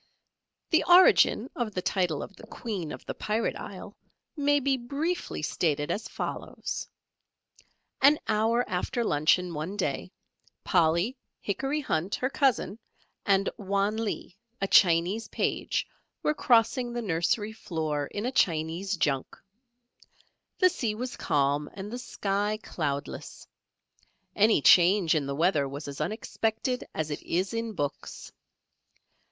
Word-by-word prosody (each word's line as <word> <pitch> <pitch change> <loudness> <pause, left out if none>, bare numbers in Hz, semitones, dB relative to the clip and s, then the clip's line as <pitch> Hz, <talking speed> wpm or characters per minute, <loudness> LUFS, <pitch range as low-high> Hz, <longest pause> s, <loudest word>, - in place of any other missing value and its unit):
The 325 - +4
origin 350 -9 +6
of 225 -4 -3
the 180 - 0
title 180 -6 0
of 200 - -10
the - - -13
Queen 195 -10 -5
of - - -9
the - - -4
Pirate 215 +2 -1
Isle, - - -8 0.4
may 290 -1 +3
be 275 0 +1
briefly 280 - -3
stated 150 -2 0
as 215 - -3
follows: - - -5 1.1
An 285 +3 +7
hour 225 +3 +2
after 185 +6 -1
luncheon, 170 0 +2
one 165 +7 -4
day, - - -2 0.5
Polly, 175 +6 +2 0.2
Hickory 270 +9 -2
Hunt, 180 - -1
her 255 +2 -2
cousin, 255 -6 +1 0.5
and 195 0 +3
Wan 200 +1 0
Lee, 220 -4 -4 0.2
a 195 - 0
Chinese 180 +4 +4
page, - - -1 0.4
were 300 - +2
crossing 240 -2 +2
the 240 0 -3
nursery 205 +4 0
floor 155 -9 -3
in 205 +2 -5
a 250 - 0
Chinese 170 -1 0
junk. 135 -5 -1 1.2
The 370 -2 +5
sea 230 -11 -2
was 250 +3 -5
calm 145 +1 0
and 200 +2 -7
the 245 - -4
sky 205 -3 -1
cloudless. 145 -4 -4 0.9
Any 215 -7 +4
change 180 -1 +6
in 150 -4 0
the 140 - -3
weather 155 -3 +2
was 140 +2 -7
as 140 -1 -6
unexpected 225 +3 -2
as 155 -1 -2
it 145 - -4
is 185 +5 -1
in 230 -1 -3
books. 145 -7 -5
200 Hz, 135 wpm, -28 LUFS, 165-235 Hz, 1.2 s, An